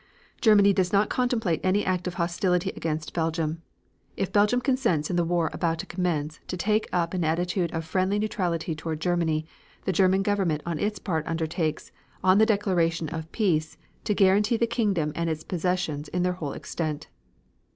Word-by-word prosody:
Germany 205 -3 +6
does 185 -1 +1
not 205 +1 +2
contemplate 230 - 0
any 190 +2 +2
act 180 -1 -1
of 180 - -4
hostility 180 +1 0
against 155 -1 -3
Belgium. 165 -1 -1 0.6
If 195 - -2
Belgium 210 +4 +4
consents 240 - +1
in - - 0
the 175 - +2
war 170 -1 0
about 165 -2 0
to - - -5
commence 155 -4 -2
to 180 - -4
take 215 +4 +1
up 170 -1 0
an 180 -2 0
attitude 175 +2 0
of 165 -1 -3
friendly 185 +4 0
neutrality 180 -6 -1
toward 155 0 -4
Germany, 160 -2 0 0.4
the 190 - +1
German 190 +2 +3
Government 190 -7 0
on 170 -2 -2
its 210 0 -1
part 160 -5 -2
undertakes, 160 -1 -2 0.3
on 185 +2 +5
the 220 - +5
declaration 175 -7 +1
of 160 0 -6
peace, 160 -8 0 0.3
to 210 - +1
guarantee 205 +4 +4
the 235 - +2
kingdom 205 -10 0
and 170 +1 -1
its 160 -1 -3
possessions 175 -4 -2
in 180 0 -1
their 180 0 +1
whole 155 -6 -5
extent. 155 -3 -4
175 Hz, 175 wpm, -26 LUFS, 160-200 Hz, 0.6 s, Germany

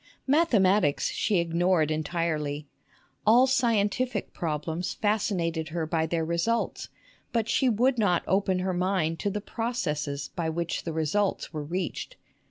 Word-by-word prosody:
Mathematics 210 - +3
she 210 -3 +1
ignored 170 -1 +2
entirely. 155 -2 -2 0.6
All 235 +4 +6
scientific 235 -3 +1
problems 160 +2 -3
fascinated 185 -7 0
her 165 0 -2
by 160 0 0
their 165 0 -1
results; 170 +8 -1 0.4
but 230 -2 0
she 260 +2 +2
would 245 +3 +2
not 180 -5 +2
open 190 -1 +1
her 185 0 -1
mind 175 -3 0
to 205 - 0
the 205 +1 -3
processes 150 - -3
by 165 -2 -1
which 170 +1 -3
the 165 - -2
results 160 +7 -1
were 155 - -3
reached. 185 - -4
180 Hz, 135 wpm, -27 LUFS, 160-215 Hz, 0.6 s, All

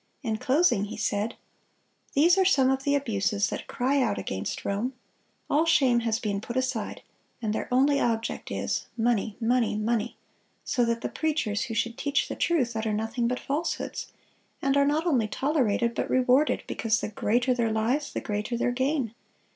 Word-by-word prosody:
In 220 -3 -1
closing 265 - +2
he 210 - -7
said: 210 +1 -1 0.8
"These 335 +5 +6
are 385 - +4
some 270 -9 +4
of 265 0 0
the 285 +1 +1
abuses 210 -6 0
that - - -5
cry 270 +3 +1
out - - +1
against - - -4
Rome. 215 +7 -1 0.5
All 315 +3 +2
shame 265 -7 +4
has 225 -2 0
been 205 -3 -2
put 235 +3 -5
aside, 255 -5 -2 0.4
and 220 -3 -1
their - - -4
only 280 +3 +4
object 230 -1 -1
is... - - -2
money, 225 -2 0
money, 235 -2 +1
money,... 225 +1 -1 0.5
so 245 - +1
that 230 0 -1
the - - -1
preachers 290 -10 -1
who 225 - -5
should 235 +2 -1
teach 285 0 +1
the - - -3
truth, 260 -9 +1
utter 220 -1 -1
nothing 225 +3 -1
but 250 +1 -1
falsehoods, 295 +5 -3 0.5
and 275 0 +1
are 280 0 +4
not 305 +3 +1
only 255 -10 +2
tolerated, 240 -3 +1
but - - -2
rewarded, 255 +3 +3
because 225 -1 0
the - - -3
greater 240 +4 +1
their 235 -2 0
lies, 240 +7 0
the - - -3
greater 210 +3 -2
their 245 - +1
gain. 260 -2 0
240 Hz, 180 wpm, -27 LUFS, 220-275 Hz, 0.8 s, These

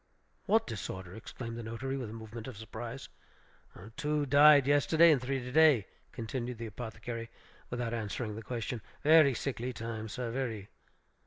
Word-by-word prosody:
"What 220 +3 +4
disorder?" 95 -3 -6
exclaimed 115 +2 -7
the - - -4
notary, 115 +4 -4
with 125 -5 -4
a - - -8
movement 110 +1 -8
of 125 -5 -8
surprise. 115 +4 -7 0.9
"Two 150 0 0
died 145 0 +7
yesterday, 155 +4 +5
and 140 -5 +3
three 135 +1 -1
to 125 - -6
day," 150 -8 +5 0.3
continued 120 +1 -4
the 115 - -5
apothecary, 115 +1 -6 0.4
without 120 -1 -3
answering 110 0 -3
the 110 - -6
question. 115 0 -4 0.2
"Very 155 -3 +6
sickly 125 0 -3
time, 115 -1 -5
sir, 125 0 -4
very." 115 -6 -3
120 Hz, 155 wpm, -31 LUFS, 110-135 Hz, 0.9 s, died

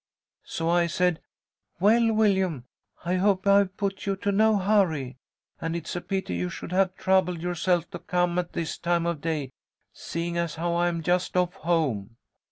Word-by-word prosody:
"So 165 - -3
I 170 0 +3
said, 180 0 0 0.6
'Well, 225 +4 +4
Willyum, 190 - +2 0.4
I 180 +2 +1
hope 190 0 +2
I've 200 -1 +4
put 195 -1 -3
you 195 - +1
to 200 +1 -1
no 215 +1 +4
hurry, 175 -11 +1 0.4
and 165 +1 -3
it's 170 0 -5
a 175 - -2
pity 190 - -3
you 90 +1 -2
should - - -8
have 185 0 +2
troubled 185 -3 +1
yourself 175 -1 0
to - - -6
come 175 0 0
at 175 -1 -4
this 165 -2 -3
time 170 0 0
of 170 -4 -2
day, 155 -5 -2 0.4
seeing 170 +1 -4
as 170 -2 -2
how 170 +1 -1
I'm 175 -1 0
just 180 +2 0
off 180 -1 +2
home.' 130 - -1
175 Hz, 175 wpm, -26 LUFS, 165-190 Hz, 0.6 s, Well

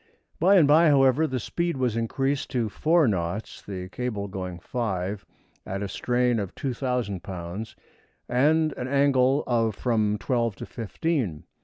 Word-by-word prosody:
By 190 +5 +5
and 165 -7 +6
by, 160 +3 +6
however, 140 +1 +4
the 130 -2 -2
speed 170 +7 -2
was 125 -4 0
increased 135 +4 -1
to 120 -4 -1
four 160 +6 +3
knots, 95 0 -2
the 90 -2 -6
cable 110 -3 -3
going 95 -2 -5
five, 95 -1 -3 0.4
at 95 +1 -4
a - - -2
strain 120 +3 +1
of 100 -3 -5
2,000 125 -7 -2
lbs., 90 +4 -6 0.5
and 155 +5 +3
an 125 - -3
angle 140 0 +3
of 115 -3 +1
from 110 -3 +1
twelve 115 -2 0
to - - -7
fifteen. 115 - -2
120 Hz, 150 wpm, -26 LUFS, 100-135 Hz, 0.5 s, and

